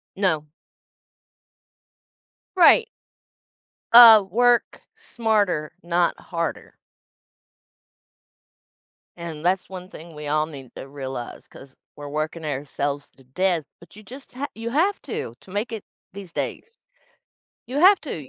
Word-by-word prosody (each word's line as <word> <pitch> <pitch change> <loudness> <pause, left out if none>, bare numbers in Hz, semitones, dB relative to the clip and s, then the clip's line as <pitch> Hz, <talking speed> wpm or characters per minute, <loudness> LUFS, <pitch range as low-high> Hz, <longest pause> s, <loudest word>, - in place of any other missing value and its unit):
No. 180 -6 0 2.1
Right. 410 +6 +6 1.0
Uh, 230 -3 +10
work 245 +2 +2
smarter, 215 - -1
not 170 0 +1
harder. 170 -2 -5 2.4
And 170 -2 -7
that's 185 +1 0
one 185 -1 -9
thing 165 -2 -12
we 150 0 -7
all 155 +1 +1
need 135 -5 -12
to - - -9
realize 135 -3 -7
'cause 135 -1 -15 0.2
we're 145 0 -9
working 155 +2 -4
ourselves 145 0 -4
to 135 - -22
death, 170 +5 -1 0.2
but 170 - -17
you 210 - -12
just 260 +6 -13
ha 270 +3 -4
you 230 +1 -5
have 360 +9 +1
to, 170 - -5
to 185 - -17
make 205 +5 -3
it 220 -3 -6 0.3
these 195 -4 -10
days. 460 +1 -5 0.9
You 265 +3 -4
have 380 +4 +6
to. 155 - -7
180 Hz, 120 wpm, -23 LUFS, 150-230 Hz, 2.4 s, Uh